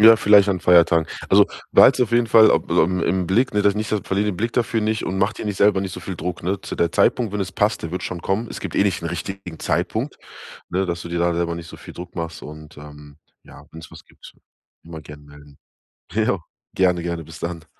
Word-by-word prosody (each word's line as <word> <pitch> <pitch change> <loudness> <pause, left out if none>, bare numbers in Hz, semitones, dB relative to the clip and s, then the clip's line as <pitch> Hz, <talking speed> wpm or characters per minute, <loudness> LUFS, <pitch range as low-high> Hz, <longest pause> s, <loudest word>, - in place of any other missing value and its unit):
Ja, 115 +1 +8
vielleicht 105 -1 +5
an 95 -2 0
Feiertagen. 85 -2 +4 0.2
Also, - - +5 0.3
behalte - - +6
es 120 - 0
auf - - -12
jeden 120 0 +3
Fall, 110 -1 +7
ob - - 0
aufm 90 +3 +2
im 95 -1 0
Blick, 115 +9 +1
ne? 105 0 +1
Das 100 0 +3
nicht 110 +1 -3
verliere 105 -1 -1
den 90 - -7
Blick 115 +4 -2
dafür 115 -2 0
nicht 110 +1 -1
und 95 - -3
macht 100 +3 0
dir - - -5
nicht 105 -2 -3
selber 100 -2 +3
nicht 95 -1 -5
so - - -7
viel 95 - -6
Druck, 90 +1 -5
ne? 95 +3 -2
Zu - - -7
der 85 -1 0
Zeitpunkt, 115 -5 +1
wenn 105 - -3
es 95 -1 -4
passt, 110 +2 0
der 85 - -5
wird 90 - -4
schon 85 -2 -5
kommen. 110 +4 -2
Es - - -8
gibt - - -6
eh - - +4
nicht 95 - 0
den 85 - -4
richtigen 85 0 -7
Zeitpunkt, - - -2 0.5
ne? 95 +2 0
Dass 85 0 -4
du - - -8
dir 85 0 -3
da 85 0 +1
selber 85 0 -1
nicht 85 - -8
so - - -11
viel - - -12
Druck 90 - -10
machst 85 -2 -6
und, 75 0 -11
ähm, 75 0 -13 0.2
ja, - - -16
wenn 80 - -10
es 80 - -13
was - - -14
gibt, - - -16 0.5
immer 80 -1 -9
gern 75 -1 -13
melden. 75 -1 -17 0.5
Ja, 105 -3 0 0.3
gerne, 90 -2 +1
gerne, 85 -1 -4
bis 80 +2 -12
dann. 85 -1 -5
90 Hz, 255 wpm, -21 LUFS, 85-105 Hz, 0.5 s, Ja